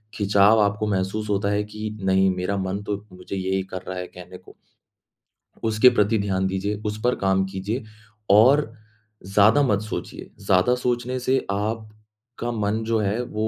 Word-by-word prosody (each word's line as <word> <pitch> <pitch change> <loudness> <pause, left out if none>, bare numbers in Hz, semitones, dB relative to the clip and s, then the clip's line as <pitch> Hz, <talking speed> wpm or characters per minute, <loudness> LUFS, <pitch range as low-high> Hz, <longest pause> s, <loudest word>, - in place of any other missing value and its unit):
खिंचाव 100 +1 +4
आपको 105 +1 0
महसूस 105 +2 -2
होता 100 0 0
है 105 0 0
कि 105 +1 -6
नहीं, 95 0 +3
मेरा 90 +2 -2
मन 95 +1 -3
तो 100 0 -4
मुझे 90 +1 -7
यही 95 0 -1
कर 95 - -4
रहा 95 - -5
है 90 - -5
कहने 90 0 -12
को। - - -18 1.1
उसके 110 +2 +5
प्रति 110 -2 +2
ध्यान 95 -1 0
दीजिए, 95 +2 -2
उस 105 0 -3
पर 125 +1 +2
काम 95 0 +1
कीजिए 100 +6 -4 0.5
और 115 +5 +5 0.5
ज़्यादा 105 +8 +4
मत 105 -6 +1
सोचिए। 110 - -6 0.2
ज़्यादा 95 +6 +3
सोचने 125 0 -2
से 130 +1 +1
आपका 110 +3 -5
मन 110 0 -1
जो 115 0 +1
है 105 +3 0
वो 110 -2 -3
105 Hz, 165 wpm, -23 LUFS, 95-110 Hz, 1.1 s, उसके